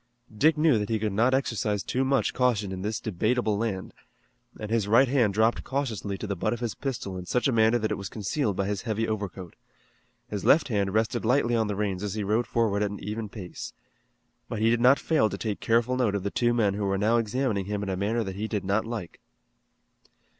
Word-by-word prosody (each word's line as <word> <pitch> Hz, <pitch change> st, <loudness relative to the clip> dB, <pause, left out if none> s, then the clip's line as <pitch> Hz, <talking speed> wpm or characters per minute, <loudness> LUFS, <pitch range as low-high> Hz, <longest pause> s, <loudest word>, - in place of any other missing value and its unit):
Dick 155 Hz, +7 st, +4 dB
knew 150 Hz, -7 st, +4 dB
that 105 Hz, -, -3 dB
he 110 Hz, -, +1 dB
could 110 Hz, -1 st, -1 dB
not 120 Hz, +6 st, +3 dB
exercise 105 Hz, -6 st, -1 dB
too 130 Hz, +8 st, -1 dB
much 135 Hz, 0 st, +1 dB
caution 115 Hz, -6 st, +1 dB
in 95 Hz, -1 st, -5 dB
this 105 Hz, +2 st, -2 dB
debatable 110 Hz, +2 st, 0 dB
land, 100 Hz, -3 st, -3 dB, 0.7 s
and 110 Hz, 0 st, -6 dB
his 115 Hz, -3 st, +1 dB
right 120 Hz, +6 st, +5 dB
hand 125 Hz, -5 st, +2 dB
dropped 110 Hz, +2 st, +2 dB
cautiously 115 Hz, -8 st, -3 dB
to -, -, -5 dB
the 100 Hz, -1 st, -2 dB
butt 110 Hz, +5 st, -1 dB
of 120 Hz, -, -5 dB
his 120 Hz, -3 st, -2 dB
pistol 120 Hz, -9 st, -4 dB
in 90 Hz, -, -9 dB
such 125 Hz, +3 st, +1 dB
a -, -, +2 dB
manner 110 Hz, 0 st, +4 dB
that 110 Hz, -2 st, -2 dB
it -, -, -2 dB
was 100 Hz, -1 st, -5 dB
concealed 105 Hz, 0 st, -2 dB
by 100 Hz, -, -1 dB
his 100 Hz, -1 st, -2 dB
heavy 115 Hz, 0 st, -1 dB
overcoat. 100 Hz, -5 st, -5 dB, 0.7 s
His 105 Hz, -2 st, -4 dB
left 155 Hz, -2 st, +4 dB
hand 100 Hz, -3 st, 0 dB
rested 110 Hz, 0 st, 0 dB
lightly 120 Hz, 0 st, +2 dB
on 110 Hz, -2 st, +1 dB
the 105 Hz, -, -2 dB
reins 100 Hz, -2 st, -2 dB
as 105 Hz, -1 st, -3 dB
he 105 Hz, -, -2 dB
rode 110 Hz, +4 st, 0 dB
forward 115 Hz, -4 st, +1 dB
at 105 Hz, -, +1 dB
an 100 Hz, -, -7 dB
even 105 Hz, +1 st, -5 dB
pace. 95 Hz, -5 st, -8 dB, 0.8 s
But 115 Hz, -, -3 dB
he 110 Hz, +2 st, +3 dB
did 120 Hz, 0 st, +1 dB
not 130 Hz, +3 st, +6 dB
fail 155 Hz, -9 st, +2 dB
to 100 Hz, -, -5 dB
take 105 Hz, -1 st, -3 dB
careful 120 Hz, +2 st, +2 dB
note 120 Hz, -6 st, +1 dB
of 100 Hz, -, -2 dB
the 100 Hz, -, -2 dB
two 120 Hz, -1 st, +2 dB
men 110 Hz, -5 st, +2 dB
who 100 Hz, 0 st, -2 dB
were 95 Hz, 0 st, 0 dB
now 110 Hz, +4 st, +2 dB
examining 115 Hz, -3 st, 0 dB
him 105 Hz, 0 st, -3 dB
in 100 Hz, -, -4 dB
a 95 Hz, -, -1 dB
manner 110 Hz, +5 st, 0 dB
that 95 Hz, -2 st, -5 dB
he 105 Hz, +2 st, -3 dB
did 105 Hz, -3 st, -3 dB
not 100 Hz, +3 st, +1 dB
like. 110 Hz, -7 st, -6 dB
110 Hz, 235 wpm, -27 LUFS, 100-120 Hz, 0.8 s, not